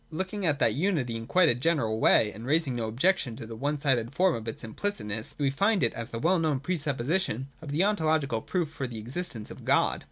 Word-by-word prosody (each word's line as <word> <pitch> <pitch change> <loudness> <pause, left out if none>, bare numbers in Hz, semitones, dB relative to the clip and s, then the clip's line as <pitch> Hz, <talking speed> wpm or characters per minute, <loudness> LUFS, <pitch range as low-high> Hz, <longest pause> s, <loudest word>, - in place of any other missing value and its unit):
Looking 190 +4 -3
at 150 -2 +2
that - - +3
unity 145 -8 0
in 115 0 -5
a - - -16
quite 155 -5 +4
general 125 -8 +1
way, 105 -1 +5
and 110 - -10
raising 145 0 +1
no 115 -2 -2
objection 125 - +1
to 115 - -8
the 115 0 -8
one 145 +6 -1
sided 130 -5 +1
form 185 -1 +3
of 115 0 -5
its 115 - -5
implicit 205 - -3
ness, 105 +1 -3
we 140 -2 +1
find 200 +5 +2
it 115 - +2
as 115 0 -6
the 115 - -5
well 170 +9 +2
known 155 -4 +1
pre 180 +7 -2
supposition 140 - -1
of 155 - -8
the 150 +6 +1
ontological 155 - +1
proof 170 0 -2
for 135 -4 -4
the 120 -2 -7
existence 120 0 -5
of - - -10
God. - - +2
140 Hz, 235 wpm, -28 LUFS, 115-170 Hz, -, way